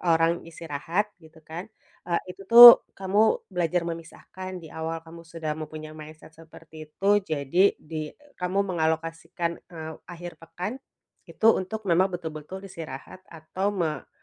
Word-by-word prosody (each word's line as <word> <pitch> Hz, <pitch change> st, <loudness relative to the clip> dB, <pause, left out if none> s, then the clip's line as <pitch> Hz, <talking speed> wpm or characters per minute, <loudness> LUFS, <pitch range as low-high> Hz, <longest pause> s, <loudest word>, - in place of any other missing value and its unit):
orang 165 Hz, -1 st, +3 dB, 0.2 s
istirahat, 165 Hz, +6 st, -3 dB
gitu 160 Hz, 0 st, -18 dB
kan, 170 Hz, +7 st, -8 dB, 0.4 s
eee, 170 Hz, -, +1 dB
itu 195 Hz, -, -14 dB
tuh, 235 Hz, +1 st, +12 dB, 0.2 s
kamu 195 Hz, +2 st, 0 dB, 0.3 s
belajar 175 Hz, 0 st, 0 dB
memisahkan, 170 Hz, +3 st, -8 dB
di -, -, -10 dB
awal 160 Hz, 0 st, -5 dB
kamu 165 Hz, +1 st, -12 dB
sudah 160 Hz, -2 st, -4 dB
mempunyai 155 Hz, 0 st, -8 dB
mindset 155 Hz, +1 st, -12 dB
seperti 160 Hz, -1 st, -14 dB
itu, 200 Hz, +6 st, +2 dB
jadi, 160 Hz, +2 st, +1 dB
di 155 Hz, -1 st, -7 dB, 0.3 s
kamu 190 Hz, +3 st, 0 dB
mengalokasikan, 165 Hz, 0 st, -2 dB
eee, 160 Hz, -2 st, -7 dB, 0.2 s
akhir 175 Hz, 0 st, -8 dB
pekan, 180 Hz, +6 st, -5 dB, 0.6 s
itu 220 Hz, -, -1 dB
untuk 215 Hz, +3 st, -4 dB
memang 185 Hz, 0 st, +3 dB
betul-betul 170 Hz, +2 st, -7 dB
istirahat 165 Hz, -1 st, -9 dB
atau 170 Hz, +5 st, -4 dB
me 165 Hz, -8 st, -2 dB
165 Hz, 135 wpm, -26 LUFS, 160-185 Hz, 0.6 s, tuh